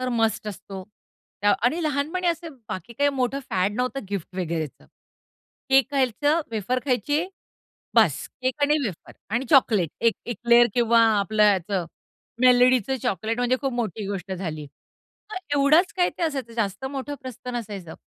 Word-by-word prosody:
तर 255 Hz, -, -2 dB
मस्ट 225 Hz, -3 st, 0 dB
असतो 195 Hz, -1 st, -8 dB, 0.8 s
आणि 250 Hz, +7 st, +2 dB
ते 345 Hz, -, -3 dB
लहानपणी 310 Hz, +5 st, -1 dB
असं 330 Hz, -2 st, -2 dB
बाकी 220 Hz, +5 st, -6 dB
काही 285 Hz, +4 st, +2 dB
मोठं 270 Hz, 0 st, -1 dB
फॅड 190 Hz, +2 st, +1 dB
नव्हतं 255 Hz, -1 st, -2 dB
गिफ्ट 190 Hz, -2 st, -5 dB
वगैरेच. 165 Hz, -5 st, -2 dB, 1.0 s
केक 270 Hz, -1 st, +5 dB
खायचं, 285 Hz, +4 st, +1 dB
वेफर 225 Hz, +3 st, -1 dB
खायचे 290 Hz, -, 0 dB, 0.7 s
बस. -, -, +4 dB, 0.2 s
केक 260 Hz, +3 st, -1 dB
आणि 300 Hz, +1 st, +3 dB
वेफर 190 Hz, -7 st, -6 dB, 0.2 s
आणि 240 Hz, +4 st, 0 dB
चॉकलेट 215 Hz, -, +4 dB
एक 230 Hz, -, +4 dB
एक्लियर्स 235 Hz, 0 st, +4 dB
किंवा 235 Hz, -1 st, +4 dB, 0.2 s
आपलं 210 Hz, +2 st, +1 dB
ह्याचं 195 Hz, -2 st, +2 dB, 0.6 s
मेलडीचं 255 Hz, 0 st, +4 dB
चॉकलेट 220 Hz, +4 st, -1 dB
म्हणजे 245 Hz, +1 st, +2 dB
खूप 270 Hz, -2 st, -1 dB
मोठी 215 Hz, -4 st, -3 dB
गोष्ट 195 Hz, -1 st, -5 dB
झाली. 160 Hz, -5 st, -5 dB, 0.7 s
तर -, -, -5 dB, 0.2 s
एवढाच 305 Hz, +6 st, +4 dB
काय 355 Hz, -1 st, +3 dB
ते -, -, -3 dB
असायचं. 270 Hz, -7 st, -2 dB
जास्त 205 Hz, +1 st, -2 dB
मोठं 275 Hz, +1 st, -4 dB
प्रस्थ 250 Hz, -1 st, -9 dB
नसायचं. 205 Hz, -8 st, -6 dB
240 Hz, 150 wpm, -24 LUFS, 200-275 Hz, 1.0 s, केक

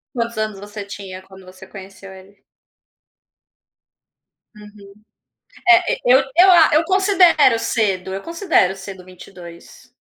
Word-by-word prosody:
Quantos 235 Hz, -2 st, -4 dB
anos 215 Hz, -2 st, -4 dB
você 205 Hz, 0 st, -10 dB
tinha 195 Hz, -2 st, -10 dB
quando 190 Hz, 0 st, -17 dB
você 185 Hz, +1 st, -15 dB
conheceu 195 Hz, 0 st, -13 dB
ele? 190 Hz, +1 st, -18 dB, 2.1 s
Uhum, 210 Hz, -1 st, -16 dB, 0.8 s
eh 355 Hz, 0 st, +6 dB
eh, -, -, -12 dB
eu 255 Hz, +2 st, +5 dB, 0.2 s
eu 375 Hz, +2 st, +6 dB
a 340 Hz, -3 st, +5 dB
eu 310 Hz, +2 st, +3 dB
considero 365 Hz, -, +2 dB
cedo, 190 Hz, -5 st, -3 dB
eu 195 Hz, -, -7 dB
considero 335 Hz, -, -1 dB
cedo, 190 Hz, -1 st, -11 dB
22 180 Hz, +5 st, -15 dB
205 Hz, 125 wpm, -18 LUFS, 190-265 Hz, 2.1 s, eh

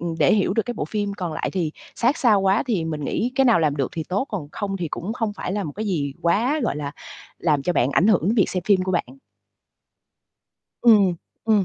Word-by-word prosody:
ừm, 170 Hz, 0 st, -3 dB
để 150 Hz, +5 st, +4 dB
hiểu 195 Hz, -2 st, +1 dB
được 225 Hz, -, +2 dB
cái 245 Hz, -, -3 dB
bộ -, -, -3 dB
phim 205 Hz, -2 st, -2 dB
còn 180 Hz, -5 st, -4 dB
lại -, -, -3 dB
thì 170 Hz, -5 st, -1 dB, 0.2 s
sát 250 Hz, +6 st, +2 dB
sao 215 Hz, -6 st, +4 dB
quá 195 Hz, +2 st, +2 dB
thì 195 Hz, -9 st, 0 dB
mình 155 Hz, -3 st, -4 dB
nghĩ 245 Hz, -, -1 dB
cái 270 Hz, -1 st, +3 dB
nào 235 Hz, -7 st, +5 dB
làm 150 Hz, -2 st, +1 dB
được 135 Hz, -, 0 dB
thì 160 Hz, -2 st, -4 dB
tốt, 200 Hz, +8 st, -1 dB
còn 175 Hz, -9 st, -4 dB
không 195 Hz, -2 st, -3 dB
thì 170 Hz, -4 st, -3 dB
cũng 195 Hz, +9 st, -4 dB
không 225 Hz, -3 st, -2 dB
phải 185 Hz, -, -5 dB
là 205 Hz, -1 st, -2 dB
một 150 Hz, -, -5 dB
cái 215 Hz, +5 st, -4 dB
gì 145 Hz, -8 st, -1 dB
quá, 240 Hz, -, +2 dB
gọi 150 Hz, -, -1 dB
là, 145 Hz, -1 st, -4 dB, 0.5 s
làm 150 Hz, -5 st, +1 dB
cho 180 Hz, -, 0 dB
bạn 130 Hz, -4 st, +2 dB
ảnh 175 Hz, -, +3 dB
hưởng 215 Hz, -5 st, +4 dB
đến 205 Hz, +8 st, +1 dB
việc 205 Hz, -, +2 dB
xem 180 Hz, -2 st, -2 dB
phim 195 Hz, -3 st, +4 dB
của 185 Hz, 0 st, -2 dB
bạn. 175 Hz, -, 0 dB, 1.8 s
Ừm, 230 Hz, -3 st, +8 dB
ừm, 180 Hz, -, 0 dB, 0.3 s
ừm. 215 Hz, -3 st, +3 dB
190 Hz, 255 wpm, -23 LUFS, 165-215 Hz, 1.8 s, Ừm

